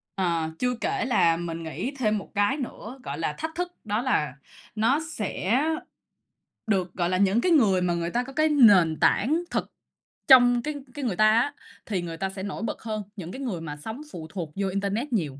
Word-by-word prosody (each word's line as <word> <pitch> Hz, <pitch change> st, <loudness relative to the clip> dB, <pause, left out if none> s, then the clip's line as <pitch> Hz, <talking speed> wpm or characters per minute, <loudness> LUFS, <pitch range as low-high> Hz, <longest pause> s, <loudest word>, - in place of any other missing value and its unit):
Ờ, 170 Hz, -4 st, 0 dB
chưa 250 Hz, 0 st, +1 dB
kể 405 Hz, 0 st, 0 dB
là 170 Hz, -10 st, +3 dB
mình 165 Hz, -1 st, -5 dB
nghĩ 160 Hz, -, -4 dB
thêm 215 Hz, -3 st, +2 dB
một 200 Hz, -, -8 dB
cái 205 Hz, +8 st, +2 dB
nữa 255 Hz, -1 st, -7 dB
gọi -, -, -5 dB
là -, -, -1 dB
thách 320 Hz, 0 st, -5 dB
thức. 355 Hz, 0 st, -3 dB
Đó 210 Hz, +2 st, 0 dB
là 205 Hz, -, 0 dB, 0.4 s
nó 230 Hz, +7 st, +3 dB
sẽ 220 Hz, -, 0 dB, 1.1 s
được, 185 Hz, -4 st, 0 dB
gọi 175 Hz, -1 st, 0 dB
là, 185 Hz, -, +1 dB
những 200 Hz, +4 st, +3 dB
cái 360 Hz, -, +2 dB
người 210 Hz, -, +4 dB
mà 180 Hz, -1 st, +1 dB
người 170 Hz, 0 st, -2 dB
ta 240 Hz, +1 st, 0 dB
có 270 Hz, +2 st, -10 dB
cái 310 Hz, +3 st, +2 dB
nền 200 Hz, -, +6 dB
tảng 310 Hz, -, +3 dB
thực -, -, -2 dB, 0.6 s
trong 245 Hz, -2 st, +7 dB
cái 300 Hz, 0 st, -3 dB, 0.2 s
cái 285 Hz, -1 st, -4 dB
người 220 Hz, -7 st, 0 dB
ta 215 Hz, +3 st, +5 dB
á, 240 Hz, +6 st, +2 dB, 0.3 s
thì 195 Hz, -5 st, -2 dB
người 165 Hz, -1 st, -6 dB
ta 190 Hz, +2 st, -2 dB
sẽ 190 Hz, 0 st, -7 dB
nổi 200 Hz, +2 st, -5 dB
bật 225 Hz, -, -4 dB
hơn 215 Hz, -2 st, -4 dB
những 180 Hz, -4 st, -7 dB
cái 260 Hz, -, -7 dB
người 205 Hz, -11 st, -3 dB
mà 150 Hz, -2 st, -6 dB
sống 220 Hz, -, -7 dB
phụ 160 Hz, -2 st, -7 dB
thuộc 170 Hz, -5 st, -5 dB
vô 195 Hz, 0 st, -1 dB
internet 200 Hz, +7 st, -2 dB
nhiều, 150 Hz, -9 st, -1 dB
210 Hz, 215 wpm, -26 LUFS, 175-250 Hz, 1.1 s, trong